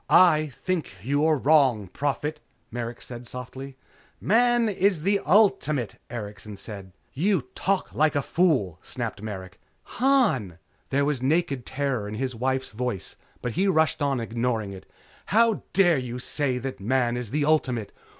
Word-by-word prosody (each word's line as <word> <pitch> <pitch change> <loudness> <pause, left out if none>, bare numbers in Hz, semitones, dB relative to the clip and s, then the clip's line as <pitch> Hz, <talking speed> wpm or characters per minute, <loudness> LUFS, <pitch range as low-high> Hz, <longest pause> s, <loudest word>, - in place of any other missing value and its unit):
"I 155 -4 +6 0.2
think 170 - -2
you 140 +5 +1
are 155 -1 +3
wrong, 135 -8 +3
Prophet," 145 - -2 0.3
Merrick 120 0 -5
said 120 -1 -8
softly. 130 +2 -7 0.4
"Man 240 +2 +3
is 195 -5 +1
the 200 +2 +3
ultimate," 155 - +2
Erikson 105 -2 -7
said. 100 -2 -9 0.2
"You 180 +1 +1
talk 195 +1 -1
like 155 0 +2
a 140 - +1
fool," 130 - +1
snapped 115 -5 -5
Merrick. 100 -3 -7 0.4
"Han!" 230 - +2 0.3
There 140 +1 +2
was 145 -4 0
naked 140 -2 0
terror 130 -6 -1
in 105 - -5
his 130 +2 -2
wife's 130 0 -1
voice, 120 -2 -4 0.3
but 125 - -1
he 190 - +1
rushed 160 -4 +2
on, 140 -3 +1
ignoring 115 -3 -2
it. 95 - -11 0.4
"How 225 +1 +3
dare 175 -7 +4
you 125 -1 -5
say 130 0 -1
that 130 +1 -5
Man 120 +3 +1
is 120 -3 -4
the 145 +4 0
ultimate? 130 -8 +1
130 Hz, 150 wpm, -26 LUFS, 115-160 Hz, 0.4 s, I